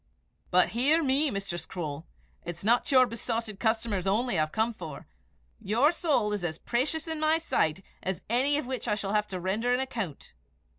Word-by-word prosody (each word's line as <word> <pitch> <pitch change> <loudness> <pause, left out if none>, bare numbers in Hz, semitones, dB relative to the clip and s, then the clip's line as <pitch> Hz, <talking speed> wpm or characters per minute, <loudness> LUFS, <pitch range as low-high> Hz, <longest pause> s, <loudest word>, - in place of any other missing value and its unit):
"But 180 0 +4
hear 285 +8 +3
me, 280 +2 +2
Mistress 195 -6 -3
Croale: 160 -2 -5 0.4
it's 175 0 -6
not 235 +6 +3
your 255 -2 +7
besotted 230 -3 -3
customers 220 -4 0
only 225 +3 +1
I - - +2
have 155 0 +1
to - - -14
care 235 +1 -2
for. 165 -9 -8 0.5
Your 240 +10 +3
soul 300 -11 +1
is 205 -3 -3
as 160 -2 -2
precious 295 - -1
in 320 -1 -3
my 310 +1 +3
sight 190 - 0 0.2
as 190 -1 -3
any 265 +6 +2
of 295 - -2
which 255 -2 -4
I - - +2
shall 200 -1 -3
have 210 0 +2
to 185 -2 -4
render 215 +7 +1
an - - -1
account." 225 - -4
225 Hz, 195 wpm, -29 LUFS, 190-260 Hz, 0.5 s, your